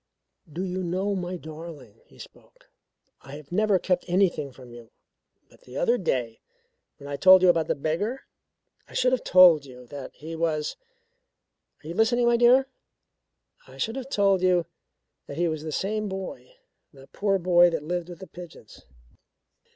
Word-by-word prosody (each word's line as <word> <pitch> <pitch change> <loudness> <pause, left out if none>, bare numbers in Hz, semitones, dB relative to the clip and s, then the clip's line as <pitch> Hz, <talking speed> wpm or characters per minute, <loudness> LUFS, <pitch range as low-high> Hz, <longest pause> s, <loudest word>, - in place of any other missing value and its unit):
"Do 170 +5 -4
you 185 0 -3
know, 185 +4 -1
my 180 -1 -4
darling," 155 -7 -11
he - - -21
spoke. - - -17 0.5
"I 135 +2 -11
have 150 0 -13
never 210 +1 +2
kept 180 0 -1
anything 175 -6 +1
from 125 -2 -14
you 120 -1 -13 0.6
but - - -23
the 125 +1 -11
other 240 +10 +1
day 120 - -2 0.6
when 140 - -11
I 140 0 -4
told 185 +3 +7
you 185 - +6
about 165 -2 +2
the - - 0
beggar, 185 - -3 0.6
I - - -15
should 250 0 +2
have 255 - 0
told 175 -5 +6
you 125 -2 -13
that 135 +1 -9
he 160 +2 -8
was 160 -2 -2 1.1
Are - - -11
you 165 - -5
listening, 235 +4 +2
my 235 0 +3
dear? 245 +3 +5 1.0
I - - -15
should 225 +1 -2
have 265 0 -6
told 200 -6 +2
you 180 -2 +2 0.6
that 140 - -8
he 175 +1 +1
was 155 -2 -3
the 155 0 -6
same 210 +5 -2
boy 195 - -7 0.4
the 135 -2 -16
poor 195 +7 -1
boy 175 -1 +5
that 165 -3 -4
lived 175 +2 -4
with 175 - -9
the 190 - -10
pigeons. 175 -1 -13
175 Hz, 175 wpm, -25 LUFS, 150-195 Hz, 1.1 s, told